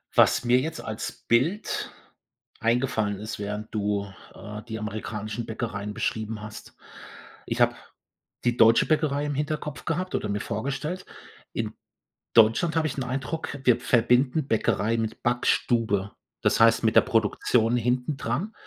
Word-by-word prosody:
Was -, -, +5 dB
mir 125 Hz, +1 st, +4 dB
jetzt 160 Hz, +4 st, -4 dB
als 110 Hz, -1 st, -4 dB, 0.2 s
Bild 155 Hz, -, +1 dB, 0.7 s
eingefallen 115 Hz, -4 st, 0 dB
ist, 110 Hz, +1 st, -6 dB
während 105 Hz, +1 st, -5 dB
du, 105 Hz, -1 st, 0 dB, 0.3 s
äh, 105 Hz, +1 st, -8 dB
die 110 Hz, -1 st, -4 dB
amerikanischen 110 Hz, +1 st, -4 dB
Bäckereien 105 Hz, -2 st, -4 dB
beschrieben 110 Hz, -1 st, -3 dB
hast: 105 Hz, 0 st, -10 dB, 0.7 s
Ich -, -, -2 dB
habe -, -, +4 dB, 0.7 s
die 120 Hz, 0 st, +2 dB
deutsche 115 Hz, 0 st, +6 dB
Bäckerei 150 Hz, -2 st, +1 dB
im 145 Hz, -1 st, -2 dB
Hinterkopf 150 Hz, 0 st, -3 dB
gehabt 180 Hz, +2 st, -2 dB
oder -, -, -1 dB
mir 100 Hz, 0 st, -1 dB
vorgestellt. 140 Hz, -, -3 dB, 0.5 s
In -, -, -3 dB, 0.6 s
Deutschland 115 Hz, +9 st, +5 dB
habe 160 Hz, -1 st, +2 dB
ich -, -, -4 dB
'n 135 Hz, -, -1 dB
Eindruck, 135 Hz, +4 st, -3 dB
wir 125 Hz, -1 st, +5 dB
verbinden 125 Hz, +5 st, +2 dB
Bäckerei 110 Hz, -1 st, +1 dB
mit 115 Hz, 0 st, -3 dB
Backstube, 115 Hz, -4 st, +1 dB, 0.3 s
das -, -, +2 dB
heißt 115 Hz, 0 st, +5 dB
mit 110 Hz, 0 st, +2 dB
der -, -, +10 dB
Produktion 115 Hz, 0 st, +2 dB
hintendran. 125 Hz, -, -1 dB
115 Hz, 140 wpm, -26 LUFS, 110-135 Hz, 0.7 s, der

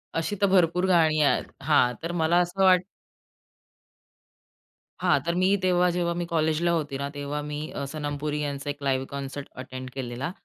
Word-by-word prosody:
अशी 165 Hz, +5 st, -1 dB
तर 200 Hz, -, +5 dB
भरपूर 180 Hz, 0 st, +3 dB
गाणी 160 Hz, -3 st, +4 dB
आ -, -, +3 dB, 0.3 s
हां 125 Hz, -5 st, +4 dB
तर 165 Hz, -, -2 dB
मला 165 Hz, +2 st, +3 dB
असं 180 Hz, +2 st, 0 dB
वाट 185 Hz, -1 st, +6 dB, 2.2 s
हां. 155 Hz, -6 st, +3 dB
तर 170 Hz, +1 st, 0 dB
मी 185 Hz, +1 st, +2 dB, 0.2 s
तेव्हा, 180 Hz, -1 st, +3 dB
जेव्हा 170 Hz, -1 st, 0 dB
मी 175 Hz, -, -2 dB
कॉलेजला 165 Hz, 0 st, +1 dB
होती 150 Hz, -4 st, -1 dB
ना, 140 Hz, +1 st, -3 dB
तेव्हा 145 Hz, +1 st, -3 dB
मी 150 Hz, 0 st, -4 dB, 0.3 s
सनम 145 Hz, -1 st, -4 dB
पुरी 150 Hz, 0 st, -2 dB
यांचा 140 Hz, 0 st, -4 dB
एक 145 Hz, 0 st, -5 dB
लाईव्ह 135 Hz, -1 st, 0 dB
कॉन्सर्ट 140 Hz, 0 st, -6 dB
अटेंड 130 Hz, 0 st, -7 dB
केलेला. 130 Hz, +3 st, -4 dB
155 Hz, 165 wpm, -26 LUFS, 140-175 Hz, 2.2 s, वाट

